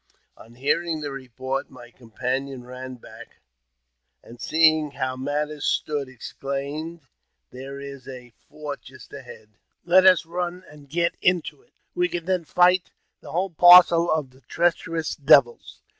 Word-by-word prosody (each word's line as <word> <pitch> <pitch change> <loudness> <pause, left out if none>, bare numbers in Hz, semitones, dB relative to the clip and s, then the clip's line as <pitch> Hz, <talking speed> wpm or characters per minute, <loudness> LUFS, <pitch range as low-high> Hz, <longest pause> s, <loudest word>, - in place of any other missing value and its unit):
On 115 +1 -17
hearing 155 +5 -1
the 145 -1 -5
report, 130 0 -5
my 120 -2 -14
companion 130 +3 -5
ran 130 +1 -8
"back, 120 - -14 0.9
and, 120 0 -14
seeing 155 -1 +3
how 130 -2 -4
matters 145 +2 -3
stood, 145 -3 -1
exclaimed, 140 +6 -6 0.3
" - - -54
There 135 +2 -9
is 140 -2 -10
a 125 -3 -11 0.2
fort 145 -4 -7
just 130 +3 -15
ahead, 125 -6 -12 0.4
let 185 +2 +5
us 185 -3 +5
run 175 +2 -4
and 145 -2 -16
get 170 +3 0
into 180 - 0
it; 465 - -33 0.2
we 355 0 0
can 170 -1 -5
then 185 -2 -1
fight 180 +2 +3 0.3
the - - -12
whole 185 +2 -1
parcel 175 0 +7
of 150 -5 -1
the 130 +1 -22
treacherous 165 -1 -1
devils." 140 -4 +3
145 Hz, 145 wpm, -23 LUFS, 130-170 Hz, 0.9 s, parcel